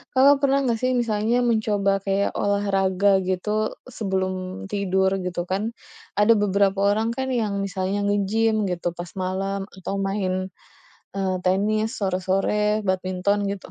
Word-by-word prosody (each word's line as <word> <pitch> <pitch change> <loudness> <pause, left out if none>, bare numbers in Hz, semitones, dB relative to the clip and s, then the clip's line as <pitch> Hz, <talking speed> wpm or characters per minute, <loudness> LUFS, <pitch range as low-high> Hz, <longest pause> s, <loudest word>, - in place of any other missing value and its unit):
Kakak 275 +2 +6
pernah 275 0 +3
nggak 235 -3 0
sih 255 0 +2
misalnya 225 0 +1
mencoba 210 -4 +1
kayak 195 +1 0
olahraga 195 -1 +2
gitu 210 +4 -1 0.2
sebelum 185 -2 -2
tidur, 190 -1 +1
gitu 180 -1 -3
kan? 195 +4 -1 0.5
Ada 210 +2 +6
beberapa 200 -2 +2
orang 220 +3 +1
kan 265 +2 -3
yang 215 -6 -1
misalnya 195 +1 -2
nge-gym 215 +2 +1
gitu 175 -2 -2
pas 175 0 -7
malam 195 +1 -3
atau 190 - -5
main, 190 -1 -1 0.7
eee, 190 -1 -1
tenis 215 +4 +2
sore-sore, 195 +2 0
badminton, 190 +1 0
gitu. 200 -1 -5
200 Hz, 130 wpm, -23 LUFS, 190-215 Hz, 0.7 s, Kakak